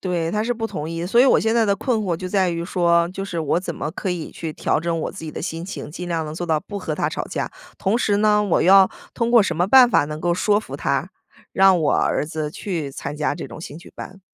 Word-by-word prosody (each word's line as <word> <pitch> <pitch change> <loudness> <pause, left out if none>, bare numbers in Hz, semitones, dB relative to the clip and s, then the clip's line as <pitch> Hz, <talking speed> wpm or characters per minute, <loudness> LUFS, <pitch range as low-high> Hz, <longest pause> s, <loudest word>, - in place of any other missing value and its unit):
对， 170 -3 -1
他 210 +2 0
是 245 - 0
不 225 -1 -3
同 155 -7 -5
意。 165 +1 -4
所 235 +6 +4
以 255 - +7
我 265 - +5
现 225 +1 +1
在 230 -1 +4
的 200 - +3
困 225 +3 -1
惑 190 -6 -1
就 185 +2 -6
在 190 -2 +2
于 170 0 -3
说， 170 -2 +2
就 195 +1 -5
是 170 -4 -4
我 155 +2 +1
怎 170 -3 -5
么 150 - -4
可 190 - -4
以 175 -3 -4
去 160 -2 -6
调 - - 0
整 170 0 -1
我 - - -3
自 - - -9
己 155 - -5
的 - - -6
心 165 +1 -4
情， 190 -5 -7
尽 180 +3 -7
量 165 -2 -1
能 150 - -6
做 175 +1 -4
到 155 -2 +1
不 200 +3 -7
和 160 -5 -3
他 - - -1
吵 - - -4
架。 - - -4 0.3
同 200 +4 +1
时 205 -4 +1
呢， 210 0 +3
我 200 -5 +1
要 190 +1 +6 0.2
通 235 0 0
过 235 -2 +6
什 195 - -2
么 175 - +2
办 255 +4 +7
法 - - +3
能 150 +1 -6
够 175 +1 +1
说 205 +3 +2
服 - - -8
他， - - -1 0.4
让 190 -2 +5
我 150 - +2
儿 - - +1
子 155 -1 -4
去 160 -5 -4
参 140 +2 -6
加 150 -1 -1
这 - - -7
种 - - -10
兴 155 -1 -8
趣 170 - -14
班。 190 +1 -9
180 Hz, 300 characters per minute, -22 LUFS, 165-205 Hz, 0.4 s, 以